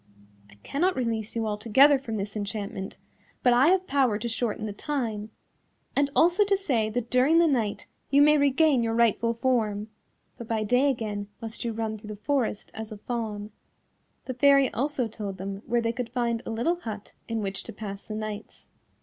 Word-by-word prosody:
I 100 - -17
cannot 360 +6 0
release 230 -4 -2
you 225 -1 0
altogether 230 +7 +4
from 225 -5 -4
this 200 +1 -4
enchantment, 200 -2 -4 0.5
but 245 - +5
I 250 +4 +5
have 375 +1 +3
power 265 - +2
to 235 - -4
shorten 225 -2 -2
the 210 - -4
time, 225 -5 -3 0.7
and 280 0 +2
also 350 +5 +5
to 400 -1 +2
say 250 - 0
that 240 +1 -3
during 260 +6 +4
the 340 - +6
night 235 -9 0 0.2
you 280 +1 +6
may 300 +1 +6
regain 280 -1 +4
your 225 -1 0
rightful 230 0 +2
form, 220 -4 0 0.5
but 235 - -7
by 225 -1 0
day 250 +6 +3
again 210 -5 -3
must 225 -1 -5
you 235 - -1
run 220 -1 -3
through 215 0 -12
the 210 - -6
forest 235 -1 -1
as 220 0 -7
a 215 - -7
Fawn." 215 -2 -4 0.7
The 255 - -3
fairy 275 +1 +4
also 265 -1 -1
told 205 -3 -6
them 195 +1 -5
where 240 0 +2
they 230 0 0
could 245 -1 -4
find 235 -2 -1
a - - -8
little 240 +10 0
hut 215 - -7
in 230 -1 -2
which 195 0 -3
to - - -6
pass 200 -2 -7
the 215 - -5
nights. 215 0 -6
230 Hz, 190 wpm, -27 LUFS, 215-270 Hz, 0.7 s, the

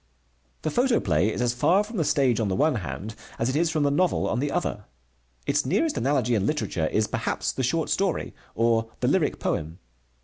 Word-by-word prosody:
The 155 - -1
photoplay 110 - +2
is 125 - -2
as 120 -1 +1
far 180 +11 +3
from 220 +1 -7
the 165 - +2
stage 135 -6 +2
on 110 - 0
the 95 - 0
one 155 +6 +3
hand 105 +1 -5 0.2
as 115 - 0
it 130 - -1
is 165 +2 +2
from 155 -2 0
the 140 - +2
novel 180 +4 +1
on - - -1
the 145 +2 0
other. - - -2 0.6
Its - - +1
nearest 310 - +1
analogy 130 -2 +1
in 105 -2 +1
literature 95 - -1
is, 110 +5 +1
perhaps, - - -2
the - - -4
short 150 +6 0
story, 195 -3 -1 0.2
or 115 0 +2
the - - +1
lyric - - +1
poem. 80 +2 -2
130 Hz, 205 wpm, -25 LUFS, 110-160 Hz, 0.6 s, far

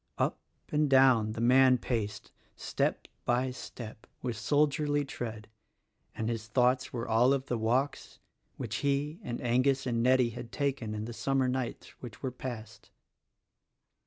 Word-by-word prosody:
Up - - 0 0.3
and 150 -1 +2
down 130 -5 +5
the 115 - -4
man 130 +1 +6
paced 110 -4 -3 0.2
step - - -1 0.2
by 125 +2 +1
step 115 -3 -9 0.2
with 120 -2 -2
soldierly 145 +3 +1
tread, 110 -5 -6 0.7
and 110 - -2
his 115 -2 -3
thoughts 125 +3 +2
were 120 -1 -4
all 120 +4 +4
of 135 -1 -1
the 120 - -1
walks 125 +6 -1 0.4
which 115 -3 -3
he 145 +3 -1
and 120 -1 -4
Angus 130 +3 +2
and 115 -2 0
Nettie 125 -1 +4
had 120 0 -8
taken 135 -7 -2
in 105 0 -4
the 120 - -6
summer 135 +2 +1
nights 125 -1 -3
which 120 -1 -10
were 130 - -1
past. 110 -4 -8
125 Hz, 150 wpm, -30 LUFS, 115-135 Hz, 0.7 s, man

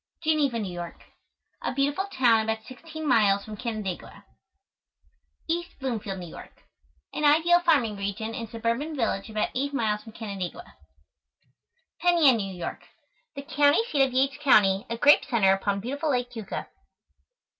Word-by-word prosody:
GENEVA, 300 -6 +2
NEW 205 -5 -3
YORK. 175 -1 -7 0.6
A - - -3
beautiful 285 +7 0
town 245 - +3
about 220 0 -2
16 315 +5 -8
miles 205 -6 +3
from 215 - -7
Canandaigua. 215 -5 -5 1.2
EAST 345 +2 -3
BLOOMFIELD, 220 -7 -3
NEW 180 -1 -7
YORK. - - -13 0.5
An - - -3
ideal 325 +4 +5
farming 280 -12 +2
region 200 +3 -4
and 230 -1 -5
suburban 230 +8 -2
village 225 -5 -1
about 215 -1 -1
8 280 +2 -2
miles 215 -4 0
from 220 0 -13
Canandaigua. 200 - -6 1.2
PENN 350 0 +3
YAN, 275 -7 +6
NEW 195 -3 -4
YORK. 175 - -5 0.5
The 280 - -6
county 290 +5 +3
seat 285 - +2
of 270 -1 +3
Yates 270 +2 +1
County, 205 -7 +4
a 230 - -3
grape 290 +5 +6
center 215 -8 +3
upon 200 +1 -1
beautiful 285 +7 -3
Lake 245 -2 0
Keuka. 225 -5 -5
235 Hz, 150 wpm, -26 LUFS, 210-290 Hz, 1.2 s, YAN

